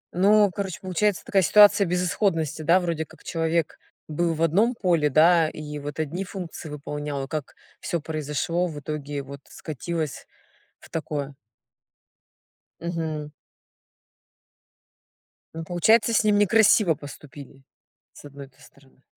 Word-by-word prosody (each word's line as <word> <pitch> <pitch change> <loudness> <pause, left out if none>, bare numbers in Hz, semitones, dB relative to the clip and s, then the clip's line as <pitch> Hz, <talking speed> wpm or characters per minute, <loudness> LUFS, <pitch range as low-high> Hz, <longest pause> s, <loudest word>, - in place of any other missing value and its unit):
Ну, 205 +2 +4
короче, 195 -3 -4
получается 190 +1 -1
такая 195 - +2
ситуация 205 +3 +6
безысходности, 175 -3 0
да 170 +4 +4
вроде 170 -3 -2
как - - -18
человек 165 -1 -1 0.3
был 165 +2 -1
в 160 - -1
одном 210 +10 +2
поле, 170 -6 +2
да 160 +2 +5
и 150 -1 -7
вот 145 +1 -7
одни 160 +5 -2
функции 180 -4 -8
выполнял, 145 -1 -5
а - - -6
как 150 -1 -5 0.2
всё 170 - -2
произошло 155 +3 -2
в 155 -4 -7
итоге 145 -1 -5
вот 140 +1 -10
скатилось 160 0 -5 0.5
в - - -16
такое. 145 -3 -4 1.5
Мгм. 160 -3 -4 2.2
Ну, 165 0 -6
получается 200 +8 +3
с 225 - +3
ним 210 -1 +3
некрасиво 205 -3 +4
поступили 145 -1 -12 0.5
с - - -14
одной-то 140 -1 -12
стороны. 135 -2 -21
160 Hz, 125 wpm, -24 LUFS, 150-180 Hz, 2.2 s, ситуация